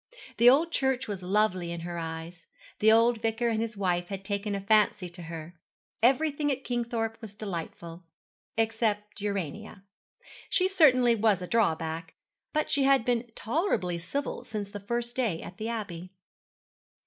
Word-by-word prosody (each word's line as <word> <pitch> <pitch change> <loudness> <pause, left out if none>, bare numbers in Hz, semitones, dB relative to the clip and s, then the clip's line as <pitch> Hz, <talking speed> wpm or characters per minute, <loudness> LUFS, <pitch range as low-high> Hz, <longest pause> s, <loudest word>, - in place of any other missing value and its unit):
The 240 +1 +8
old 315 +6 +4
church 265 -4 0
was 200 -3 -4
lovely 185 -2 +1
in 170 -1 -5
her 170 0 -5
eyes; 165 +1 -7 0.3
the 220 +1 +6
old 230 0 +4
vicar 225 +1 0
and 225 -1 0
his 225 -2 -3
wife 175 -3 0
had 195 0 -6
taken 200 0 -2
a - - -2
fancy 205 -2 +3
to 175 +1 -11
her. 165 0 -7 0.5
Everything 290 +4 +3
at 265 0 -3
Kingthorpe 230 -2 -2
was 210 -3 -9
delightful, 170 -3 -6 0.5
except 220 -2 0
Urania. 200 0 -4 0.7
She 370 - +3
certainly 255 -10 +5
was 215 -3 +3
a 180 - -5
drawback; 165 -6 0 0.4
but 305 0 0
she 280 - +3
had 270 -4 +4
been 240 -1 0
tolerably 225 - 0
civil 280 +12 -3
since 205 -2 -5
the 205 - -6
first 235 +4 -2
day 225 -11 0
at 180 - -10
the 220 +1 -3
Abbey. 185 -6 -5
215 Hz, 160 wpm, -28 LUFS, 180-240 Hz, 0.7 s, The